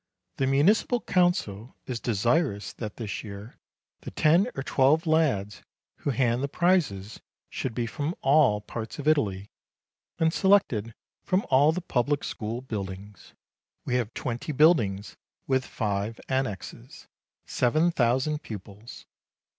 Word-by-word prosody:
The 135 - +1
municipal 190 - +3
council 175 - 0
is 125 -2 -4
desirous 120 - 0
that 105 -3 -7
this 110 -4 -5
year 105 +2 -10 0.4
the - - -8
ten 170 +9 +3
or 135 - -3
twelve 145 +6 +3
lads 145 -11 +1 0.4
who - - -3
hand 125 -2 +1
the 140 - 0
prizes 140 - 0 0.3
should 125 -4 -4
be 120 - -1
from 145 +8 -3
all 135 -7 +4
parts 110 +1 -7
of 145 0 -5
Italy, 105 -10 +1 0.7
and 160 0 +2
selected 125 - +2 0.3
from 190 +2 0
all 140 +4 +5
the 180 +3 -3
public 145 -2 0
school 115 +3 -4
buildings. 100 -4 -7 0.5
We - - -2
have 120 -3 -2
twenty 125 +5 -4
buildings, 125 - +2 0.3
with 130 -1 +1
five 105 0 -3
annexes 130 -8 -4 0.4
seven 155 +8 +2
thousand 135 +2 +1
pupils. 105 +1 -10
125 Hz, 130 wpm, -27 LUFS, 105-155 Hz, 0.7 s, all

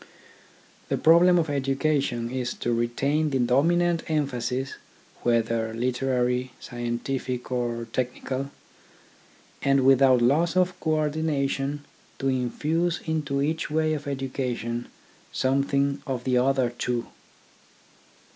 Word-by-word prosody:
The - - +1
problem 175 +2 +6
of 165 -2 +1
education 135 -3 0
is 125 -2 -2
to 120 - -1
retain 140 +6 0
the 135 - 0
dominant 165 +8 +2
emphasis, 135 -3 -1 0.5
whether 115 -1 0
literary, 125 0 0
scientific, 125 +1 -4
or 120 -2 -1
technical, 130 +2 -2 1.1
and 135 -1 +3
without 130 -2 +5
loss 160 +8 +2
of 185 0 +3
co 155 0 +1
ordination 145 -2 -1 0.3
to 135 - 0
infuse 155 +7 0
into 150 -4 -1
each 160 +2 -1
way 155 +1 +1
of 145 -2 -4
education 125 -3 -3 0.4
something 140 +1 +1
of 130 -3 -3
the 130 0 +1
other 130 -1 +2
two. 120 0 -2
135 Hz, 110 wpm, -26 LUFS, 125-150 Hz, 1.1 s, problem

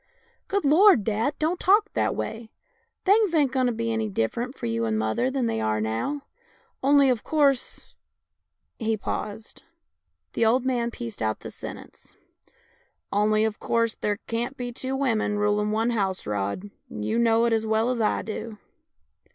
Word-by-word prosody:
" - - -39
Good 400 -5 -1
Lord, 325 - +6
dad, 225 +7 0
don't 325 +3 0
talk 420 +3 +3
that - - 0
way. 225 0 -5 0.6
Things 400 -2 +4
ain't 285 -5 +3
going 260 -1 +1
to - - +1
be 230 0 -2
any 220 -1 -1
different 235 - -2
for - - -5
you 115 0 -1
and 110 -1 0
mother 110 - 0
than 265 -2 -1
they 110 - -1
are 110 0 0
now. 115 - -2 0.6
Only, 280 0 +5
of 245 - -2
course 280 -4 0 0.4
" - - -57 0.3
He 220 -2 0
paused. 210 +1 -5 0.7
The - - +1
old 240 +3 +3
man 240 -2 0
pieced 115 - -7
out 110 -1 -1
the - - -8
sentence: - - -11 0.5
" - - -36 0.3
Only, 215 +1 +3
of 220 -1 -3
course, 230 -1 +1
there 205 -1 -2
can't 240 +4 -3
be 245 -1 -4
two 260 +2 -3
women 225 -6 0
rulin' 210 0 +1
one 225 +3 +1
house, 195 -5 -1
Rod, 105 - -3 0.2
and 105 0 -5
you 230 - 0
know 230 0 +3
it 235 - +2
as 220 0 0
well 220 +3 +2
as 240 -2 -1
I 215 - +1
do." 220 0 -6
230 Hz, 180 wpm, -25 LUFS, 210-260 Hz, 0.7 s, Lord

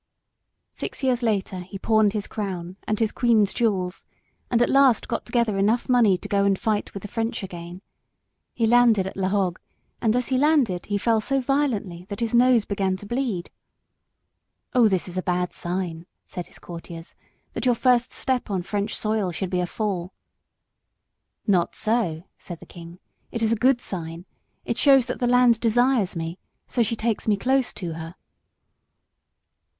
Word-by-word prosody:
Six - - -6
years 255 -2 +2
later 200 -5 -1
he 180 +2 -8
pawned 215 0 +3
his 210 -2 -2
crown 185 -4 -5
and 215 - 0
his 220 -1 +1
queen's 225 -5 +2
jewels, 190 -6 -1 0.4
and 235 - +2
at 240 - +4
last 275 -4 +4
got - - -3
together 235 -4 +1
enough 220 +5 +2
money 235 -7 +4
to - - -9
go 200 -1 +2
and 200 -1 +2
fight 215 -1 -2
with 200 - -6
the - - -5
French 225 +1 -3
again. 175 0 -8 0.7
He 230 - +1
landed 230 -4 +4
at 190 - -6
La 190 -1 0
Hogue, 190 -3 0 0.4
and 225 -1 +2
as 250 0 0
he 260 -1 +2
landed 275 - +2
he 205 - 0
fell 225 +1 +2
so 275 +5 0
violently 235 -10 -1
that 200 - -5
his 230 -1 -2
nose 240 -2 +5
began 195 -2 -1
to 205 - -11
bleed. 235 -6 -2 1.2
"Oh, 245 -4 +5
this 190 -3 0
is 180 +1 -3
a - - -1
bad 180 -1 -1
sign," 175 -1 -4 0.2
said 180 - -7
his - - -15
courtiers, 170 -1 -9 0.4
"that - - -2
your 245 - +4
first 250 0 +2
step 255 -3 -1
on 190 -3 -1
French 205 +2 -2
soil 215 -4 -1
should 185 +2 -4
be 180 -1 +1
a 175 - -1
fall." 190 -3 -3 1.3
"Not 180 -4 +2
so," 215 -8 0 0.2
said 175 -3 -8
the - - -13
king. 170 0 -11 0.3
"It 230 - -3
is 220 - +2
a - - +3
good 250 +2 +3
sign. 170 -5 -5 0.4
It - - -2
shows 270 -3 +6
that - - -4
the 245 - +1
land 245 -2 +5
desires 235 -3 +2
me: 165 +2 -4 0.3
so 245 - -1
she 230 0 +1
takes 225 -1 -2
me 210 -2 +3
close 260 +4 +1
to 170 -3 -5
her." 165 +2 -8
210 Hz, 180 wpm, -24 LUFS, 185-240 Hz, 1.3 s, shows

